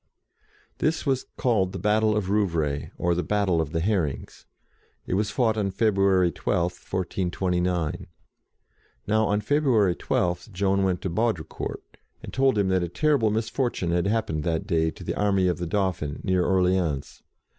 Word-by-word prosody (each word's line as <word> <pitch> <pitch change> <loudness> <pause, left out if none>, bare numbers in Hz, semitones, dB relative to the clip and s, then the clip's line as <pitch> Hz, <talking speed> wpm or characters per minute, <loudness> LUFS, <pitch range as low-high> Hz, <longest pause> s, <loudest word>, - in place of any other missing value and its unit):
This 160 +1 0
was 135 -2 0
called 100 -7 +1
the - - -4
battle 105 +2 +2
of 100 -3 -1
Rouvray, 80 -9 0
or 85 0 +1
the 85 - 0
battle 95 -2 +1
of 75 -2 -4
the 80 -1 -1
Herrings. 85 -7 -2 0.6
It - - -3
was 105 +2 +1
fought 110 -3 +1
on 100 -2 0
February 95 -3 +2
12, 85 +3 0
1429. 90 -2 -2 1.0
Now, 110 +1 +2
on 105 0 +1
February 120 -7 +2
12, 90 +4 -1
Joan 100 0 +1
went 95 -2 0
to 95 - -1
Baudricourt, 110 -3 -3 0.3
and - - -8
told 135 -3 +2
him 100 -2 +2
that 95 -1 +2
a 85 - -2
terrible 140 - +2
misfortune 110 -3 -1
had 85 +2 +1
happened 100 -8 -1
that 80 -1 -1
day 80 -1 +1
to - - -10
the - - -2
army 100 -3 +2
of 90 -1 0
the 85 - -3
Dauphin, 85 -6 -1
near 95 -2 +2
Orleans. 90 -6 0
95 Hz, 160 wpm, -25 LUFS, 85-105 Hz, 1.0 s, battle